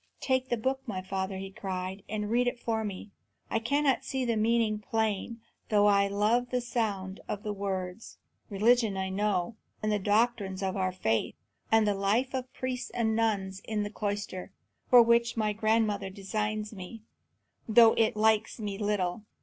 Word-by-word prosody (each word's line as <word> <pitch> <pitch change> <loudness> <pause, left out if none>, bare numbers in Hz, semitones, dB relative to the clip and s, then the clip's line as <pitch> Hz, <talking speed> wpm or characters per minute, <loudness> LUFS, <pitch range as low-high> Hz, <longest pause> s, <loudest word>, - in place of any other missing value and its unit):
"Take 260 -1 0
the 240 - +1
book, 265 +4 -1
my 190 -4 -4
father," 190 0 -3
he 195 0 -6
cried, 190 0 -5
"and 210 0 -3
read 245 +1 +2
it 245 - -1
for 225 -2 -1
me. 205 0 -6 0.4
I - - +2
cannot 275 +3 +1
see 265 -1 -2
the 235 -1 +1
meaning 220 -1 +2
plain, 220 +1 -2 0.3
though 205 -1 +4
I 200 -1 +4
love 215 +5 +1
the 250 - 0
sound 210 -6 -2
of 205 0 -4
the 210 -2 -2
words. 195 0 -4 0.3
Religion 220 0 +3
I 190 0 -2
know, 200 +1 -1 0.3
and 215 - +1
the 210 - +1
doctrines 205 -2 +1
of 190 -1 -1
our 185 -1 0
faith, 115 -12 -1 0.4
and 225 -1 +5
the 205 - +2
life 210 +7 +1
of 255 -1 -3
priests 255 -1 -4
and 220 -2 0
nuns 200 -4 0
in 215 -2 -2
the 205 - -5
cloister, 205 -3 -4 0.4
for 245 -2 +9
which 235 0 +2
my 215 -1 +1
grandmother 215 -2 +1
designs 210 +2 -3
me, 210 +3 -9 0.7
though 225 0 +7
it 220 -1 +2
likes 220 0 +2
me 205 -2 -4
little. 205 -2 -1
210 Hz, 175 wpm, -29 LUFS, 195-230 Hz, 0.7 s, for